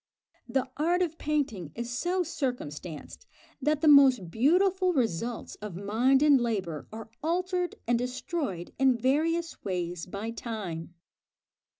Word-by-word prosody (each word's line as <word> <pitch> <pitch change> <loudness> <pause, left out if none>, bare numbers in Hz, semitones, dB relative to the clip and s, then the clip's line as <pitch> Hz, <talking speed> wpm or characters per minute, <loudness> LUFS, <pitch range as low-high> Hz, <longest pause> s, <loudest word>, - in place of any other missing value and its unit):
The 265 -1 0
art 345 +5 +2
of 330 -2 -4
painting 275 - -1
is 235 +1 -4
so 355 +8 0
circumstanced 185 - -5 0.3
that 300 +2 +1
the 320 - +3
most 265 - +6
beautiful 365 - +3
results 235 - -1
of 210 -4 -6
mind 235 +8 +2
and 285 -4 +6
labour 190 -10 -2
are 220 0 -9
altered 360 +3 -1
and 240 0 +2
destroyed 250 - -3
in 265 -2 +4
various 325 +7 0
ways 180 -3 -3
by 200 +5 -4
time. 195 -8 -6
250 Hz, 125 wpm, -28 LUFS, 205-310 Hz, 0.3 s, most